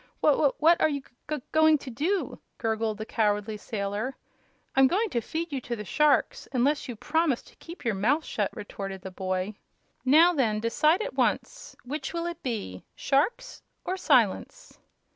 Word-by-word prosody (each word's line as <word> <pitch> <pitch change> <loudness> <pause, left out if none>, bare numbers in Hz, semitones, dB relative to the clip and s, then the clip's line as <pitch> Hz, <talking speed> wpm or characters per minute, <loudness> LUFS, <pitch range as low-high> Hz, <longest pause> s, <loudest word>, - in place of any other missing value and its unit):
"Wh - - +6
wh 280 -1 +1
what 335 +2 +5
are - - +4
you 285 -2 -2
g - - -23 0.2
g 305 -3 -2
going 315 0 +5
to 275 -2 -9
do?" 340 - -1 0.2
gurgled 220 -1 -1
the 215 - -5
cowardly 210 -1 0
sailor. 210 +4 -3 0.6
"I'm 270 0 +6
going 405 - 0
to 235 - 0
feed 325 +7 -4
you 270 - -2
to 240 - -4
the 210 -2 -7
sharks 300 - +2
unless 285 +4 +1
you 240 - -4
promise 300 +2 0
to - - -19
keep 335 -4 -11
your 230 - +2
mouth 255 +11 +1
shut," 205 -2 -1
retorted 195 -2 -7
the 190 - -7
boy. 185 +2 -2 0.5
"Now, 320 +7 +6
then; 225 -8 +1
decide 305 - +2
at - - -5
once! - - -1
Which 295 +7 -4
will 335 0 -2
it 345 0 -5
be 210 - -4
sharks 480 - 0 0.2
or 370 - -1
silence?" 290 - +1
265 Hz, 180 wpm, -27 LUFS, 215-320 Hz, 0.6 s, Wh